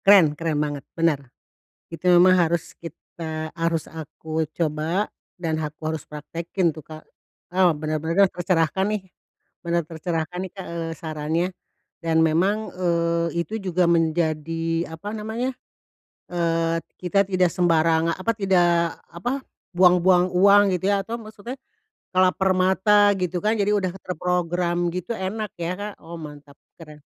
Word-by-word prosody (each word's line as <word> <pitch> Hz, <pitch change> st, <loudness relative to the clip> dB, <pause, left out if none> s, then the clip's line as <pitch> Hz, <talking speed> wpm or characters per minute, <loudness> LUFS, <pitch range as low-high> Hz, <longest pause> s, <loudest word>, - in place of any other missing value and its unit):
Keren 190 Hz, -7 st, +7 dB
keren 160 Hz, 0 st, -2 dB
banget 145 Hz, -1 st, -1 dB, 0.2 s
bener, 165 Hz, -4 st, +2 dB, 0.7 s
itu 165 Hz, -, -10 dB
memang 180 Hz, +1 st, +7 dB
harus 170 Hz, -2 st, 0 dB
kita 160 Hz, -1 st, -6 dB
harus 165 Hz, -1 st, -1 dB
aku 160 Hz, 0 st, -4 dB, 0.2 s
coba, 165 Hz, +5 st, 0 dB, 0.3 s
dan 165 Hz, -2 st, -1 dB
aku 150 Hz, 0 st, -6 dB
harus 155 Hz, -2 st, -3 dB
praktekin 165 Hz, +3 st, -2 dB
tuh, 155 Hz, -, -9 dB
Kak, 155 Hz, +1 st, -12 dB, 0.5 s
ah, 185 Hz, -2 st, +5 dB
bener 155 Hz, 0 st, -3 dB
bener 170 Hz, +5 st, +4 dB
deh -, -, -17 dB
tercerahkan, 175 Hz, +1 st, +1 dB
nih 210 Hz, -1 st, -1 dB, 0.6 s
bener 170 Hz, 0 st, 0 dB
tercerahkan 165 Hz, +1 st, -3 dB
nih 190 Hz, -, -7 dB
Kak, 190 Hz, -2 st, -7 dB
eee, 165 Hz, -1 st, -4 dB
sarannya, 160 Hz, +1 st, -1 dB, 0.6 s
dan 165 Hz, -1 st, +2 dB
memang, 190 Hz, +7 st, +1 dB
eee, 170 Hz, -1 st, 0 dB
itu 215 Hz, -, -6 dB
juga 185 Hz, -3 st, +1 dB
menjadi, 165 Hz, 0 st, 0 dB
apa 205 Hz, +7 st, -6 dB
namanya 225 Hz, +4 st, -3 dB, 0.8 s
eee, 165 Hz, -1 st, 0 dB, 0.2 s
kita 185 Hz, +2 st, +2 dB
tidak 185 Hz, -2 st, +2 dB
sembarang 165 Hz, -1 st, +3 dB
apa, 190 Hz, +6 st, -1 dB
tidak 175 Hz, -4 st, +2 dB
apa, 245 Hz, -, -3 dB, 0.3 s
buang-buang 180 Hz, 0 st, +5 dB
uang 200 Hz, +3 st, +7 dB
gitu 185 Hz, +3 st, 0 dB
ya 200 Hz, -1 st, +2 dB
atau 230 Hz, -, -4 dB
maksudnya, 220 Hz, +2 st, -8 dB, 0.6 s
lapar 185 Hz, +1 st, +3 dB
mata 205 Hz, +2 st, +4 dB
gitu 180 Hz, 0 st, -1 dB
kan 215 Hz, -, +3 dB
jadi 200 Hz, +1 st, +2 dB
udah 185 Hz, -3 st, -1 dB
terprogram 175 Hz, 0 st, -1 dB
gitu 180 Hz, +5 st, -4 dB
enak 210 Hz, 0 st, -3 dB
ya, 170 Hz, +1 st, -1 dB
Kak, 210 Hz, 0 st, -4 dB
oh 170 Hz, +1 st, -8 dB
mantap 150 Hz, -3 st, -11 dB, 0.2 s
keren. 150 Hz, -2 st, -12 dB
170 Hz, 140 wpm, -23 LUFS, 160-185 Hz, 0.8 s, Keren